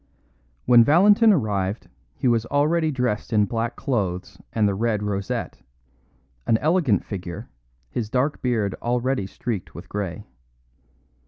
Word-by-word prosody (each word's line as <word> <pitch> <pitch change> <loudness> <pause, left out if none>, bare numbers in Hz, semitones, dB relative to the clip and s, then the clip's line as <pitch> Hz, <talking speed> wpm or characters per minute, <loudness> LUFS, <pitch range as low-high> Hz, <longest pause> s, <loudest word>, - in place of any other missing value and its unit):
When 120 -1 +7
Valentin 205 - +5
arrived 105 - -1 0.3
he - - -1
was 115 -1 +2
already 155 +3 +2
dressed 125 -7 -2
in 105 -2 +3
black 115 +2 -2
clothes 95 -9 -3
and 110 -2 +2
the 100 - +1
red 105 0 -1
rosette 100 -1 -3 0.9
an 110 - +4
elegant 150 - +1
figure, 95 +2 -7 0.4
his 105 - -4
dark 130 +5 0
beard 110 -6 0
already 120 -3 -1
streaked 105 -1 -5
with 85 - -9
grey. 100 -5 -5
115 Hz, 130 wpm, -23 LUFS, 100-130 Hz, 0.9 s, When